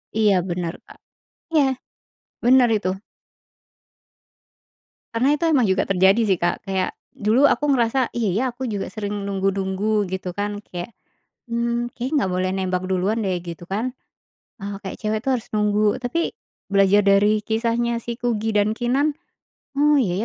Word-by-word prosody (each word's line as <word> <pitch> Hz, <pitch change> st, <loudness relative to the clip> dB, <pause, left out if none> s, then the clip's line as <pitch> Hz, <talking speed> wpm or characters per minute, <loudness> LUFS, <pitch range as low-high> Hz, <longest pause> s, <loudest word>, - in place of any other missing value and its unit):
Iya 215 Hz, -3 st, +4 dB
benar, 175 Hz, -1 st, -2 dB
Kak. -, -, -15 dB, 0.6 s
Iya, 300 Hz, -, +6 dB, 0.8 s
benar 250 Hz, 0 st, +6 dB
itu. 200 Hz, -3 st, -2 dB, 2.3 s
Karena 245 Hz, +4 st, +2 dB
itu 300 Hz, -, -5 dB
memang 265 Hz, -6 st, +4 dB
juga 190 Hz, 0 st, +2 dB
terjadi 195 Hz, +3 st, +4 dB
sih, 190 Hz, -2 st, +3 dB
Kak. 175 Hz, 0 st, -1 dB
Kayak 190 Hz, -1 st, 0 dB, 0.2 s
dulu 230 Hz, +7 st, +4 dB
aku 295 Hz, -, +1 dB
ngerasa, 245 Hz, 0 st, +1 dB
"Iya 230 Hz, -4 st, 0 dB
ya, 225 Hz, -, +1 dB
aku 255 Hz, +1 st, -4 dB
juga 205 Hz, -4 st, -3 dB
sering 205 Hz, -2 st, -4 dB
nunggu-nunggu," 195 Hz, +2 st, 0 dB
gitu 185 Hz, -1 st, -4 dB
kan, 205 Hz, 0 st, -2 dB
kayak, 180 Hz, +2 st, -7 dB, 0.6 s
"Mmm, 235 Hz, +1 st, -1 dB
kayaknya 255 Hz, +5 st, -4 dB
nggak 190 Hz, -, -2 dB
boleh 185 Hz, 0 st, 0 dB
nembak 185 Hz, -1 st, -1 dB
duluan 190 Hz, +4 st, 0 dB
deh," 190 Hz, -2 st, 0 dB
gitu 170 Hz, -1 st, -8 dB
kan. 225 Hz, +6 st, -2 dB, 0.7 s
Eee, 200 Hz, +1 st, -4 dB
kayak 190 Hz, -, -6 dB
cewek 215 Hz, 0 st, 0 dB
tuh 270 Hz, -, +2 dB
harus 235 Hz, -, -6 dB
nunggu. 210 Hz, +2 st, +2 dB
Tapi 255 Hz, +7 st, -1 dB, 0.4 s
belajar 200 Hz, +1 st, +5 dB
dari 205 Hz, +2 st, +4 dB
kisahnya 230 Hz, +2 st, 0 dB
si 235 Hz, 0 st, -5 dB
Kugy 225 Hz, -3 st, -1 dB
dan 205 Hz, +1 st, +3 dB
Keenan, 270 Hz, +5 st, +1 dB, 0.6 s
"Oh 295 Hz, +1 st, +4 dB
iya 195 Hz, -2 st, 0 dB
210 Hz, 150 wpm, -22 LUFS, 195-235 Hz, 2.3 s, Iya